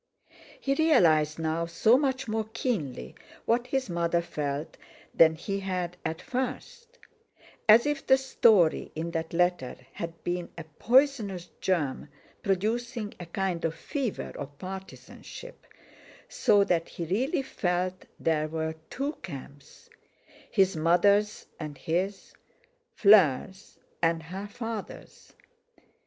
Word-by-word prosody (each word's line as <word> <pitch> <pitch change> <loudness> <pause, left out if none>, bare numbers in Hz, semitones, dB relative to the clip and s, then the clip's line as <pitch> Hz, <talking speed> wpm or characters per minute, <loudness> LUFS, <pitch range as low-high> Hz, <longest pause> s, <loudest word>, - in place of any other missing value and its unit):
He 275 - 0
realised 170 - +4
now 165 +1 -1
so 220 +7 +4
much 265 -2 0
more 220 0 -2
keenly 140 - -3 0.3
what 240 +2 +1
his 265 0 -1
mother 170 -1 0
felt 145 -1 -4 0.4
than 160 -1 +6
he 195 +5 -3
had 180 -2 -3
at 160 0 -4
first; 265 - -5 0.7
as 225 +4 +8
if 295 -1 -2
the 265 - +7
story 220 -10 +3
in 165 +2 -3
that 165 -1 -3
letter 175 -6 +1 0.2
had 165 0 -7
been 175 0 -2
a 165 - -5
poisonous 210 - +1
germ 150 -6 -1 0.3
producing 220 +3 -1
a 175 - -7
kind 180 -1 -2
of 165 0 -1
fever 270 -8 -4
of 140 +1 -7
partisanship, 190 - -10 0.6
so 210 - +3
that 175 -4 0
he 170 - -5
really 260 - 0
felt 185 -6 -2
there 155 -1 +1
were 160 0 -3 0.2
two 280 +3 -2
camps, 140 - -10 0.6
his 195 -3 +3
mother's 200 +6 +3
and 150 -3 -6
his—Fleur's 195 - +1 0.2
and 165 -1 +1
her 190 +5 -6
father's. 225 -1 -8
185 Hz, 115 wpm, -28 LUFS, 165-235 Hz, 0.7 s, as